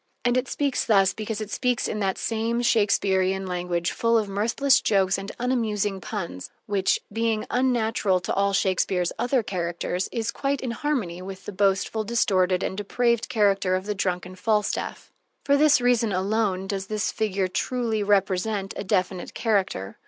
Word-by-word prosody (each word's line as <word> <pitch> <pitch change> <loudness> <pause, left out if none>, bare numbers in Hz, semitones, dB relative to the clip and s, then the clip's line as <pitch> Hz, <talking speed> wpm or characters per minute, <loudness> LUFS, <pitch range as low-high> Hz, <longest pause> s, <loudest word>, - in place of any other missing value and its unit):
And 245 0 +3
it 255 +1 +1
speaks 280 -3 0
thus 195 -3 +4
because 220 0 -4
it 215 - -6
speaks 250 -2 0
in 215 - -3
that 195 -2 0
same 230 +1 -1
Shakespearian 195 -4 +2
language, 175 -1 -2
full 230 0 +2
of 215 -2 0
mirthless 230 +8 +2
jokes 195 -2 +2
and 195 +1 -6
unamusing 215 -6 -1
puns 170 - -5 0.2
which, 195 -2 +1
being 225 -1 0
unnatural 230 -6 +1
to - - -2
all 200 0 +2
Shakespeare's 185 -2 +1
other 245 +1 +1
characters, 175 -1 -3
is 230 0 -2
quite 275 +2 -1
in 255 - -3
harmony 230 - -2
with 190 +1 -8
the - - -5
boastful, 200 +2 +1
distorted, 190 -5 +1
and - - -2
depraved 235 +3 0
character 195 -4 +2
of 185 +1 -3
the 210 - -1
drunken 185 -2 -2
Falstaff. 210 +2 -1 0.3
For 280 - +4
this 290 -1 +5
reason 245 -3 +2
alone 195 0 0
does 195 -1 -4
this 215 0 -1
figure 195 -3 -1
truly 225 +3 -1
represent 200 0 0
a - - -4
definite 185 -2 -1
character. 195 - -1
205 Hz, 160 wpm, -25 LUFS, 190-230 Hz, 0.3 s, this